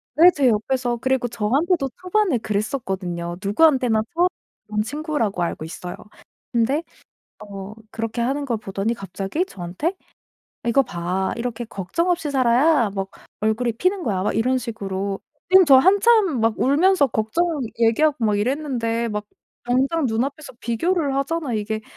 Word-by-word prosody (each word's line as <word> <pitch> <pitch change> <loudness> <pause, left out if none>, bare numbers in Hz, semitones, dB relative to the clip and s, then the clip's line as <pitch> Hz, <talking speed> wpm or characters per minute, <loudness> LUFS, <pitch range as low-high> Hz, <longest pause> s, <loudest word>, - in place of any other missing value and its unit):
네 345 +5 +8
제 275 -3 +3
옆에서. 240 +2 0
그리고 260 0 0
저한테도 270 - 0
초반에 370 - +1
그랬었거든요. 190 -6 -3
누구한테나 245 0 +3
처음 350 +2 +4 0.4
본 210 0 -1
친구라고 280 - -2
알고 170 - -3
있어요. 175 +2 -7 0.6
근데 255 +7 +1 0.6
어 200 -1 -8 0.2
그렇게 225 +1 -4
하는 270 +5 0
걸 240 -5 -1
보더니 200 +2 -2
갑자기 195 - -3
저한테 195 - -4 0.7
"이거 235 +4 +4
봐. 180 -2 -2
이렇게 240 0 -3
걱정 225 - -2
없이 330 -5 0
살아야 255 0 +3
뭐 195 -1 -3 0.3
얼굴이 220 +2 +1
피는 365 - 0
거야." 195 -6 -1
막 210 - -1
이런 255 +4 +2
식으로. 200 -5 -4 0.3
선생님 375 0 +7
저 275 -3 +8
한참 390 - +4
막 225 -1 +1
울면서 295 +4 +4
걱정 220 +9 0 0.3
얘기하고 235 +3 +3
막 210 -1 +2
이랬는데. 235 -1 -1
막 210 0 -3 0.4
당장 270 +6 +1
눈앞에서 265 +6 -2
비교를 285 +4 0
하잖아요, 275 -3 -1
이게.' 215 +1 -3
240 Hz, 330 characters per minute, -22 LUFS, 210-295 Hz, 0.7 s, 네